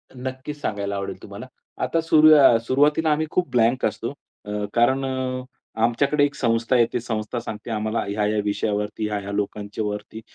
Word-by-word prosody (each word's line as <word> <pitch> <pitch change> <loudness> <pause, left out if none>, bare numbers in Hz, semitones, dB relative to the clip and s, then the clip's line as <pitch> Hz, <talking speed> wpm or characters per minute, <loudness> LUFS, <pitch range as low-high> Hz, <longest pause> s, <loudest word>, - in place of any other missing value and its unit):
नक्कीच 130 +3 -6
सांगायला 100 -5 -2
आवडेल 100 0 -5
तुम्हाला. - - -9 0.4
आता 165 - +1
सुरु 155 -1 +6
अ, 135 -5 +7
सुरुवातीला 150 +4 +3
आम्ही 155 +1 +1
खूप 180 -1 0
ब्लँक 120 +1 +2
असतो. - - -2 0.3
अ, 105 0 -3
कारण 130 +3 +3
अ, 130 -1 -3 0.4
आमच्याकडे 140 +5 +2
एक 140 - -4
संस्था 115 0 +1
येते. 120 +1 +2
संस्था 110 0 -3
सांगते 115 0 -7
आम्हाला 110 +1 -1
ह्या-ह्या 105 +1 0
विषयावरती, 105 +1 -2
ह्या-ह्या 100 -1 -4
लोकांच्यावरती 105 +1 -4
115 Hz, 150 wpm, -23 LUFS, 105-135 Hz, 0.4 s, अ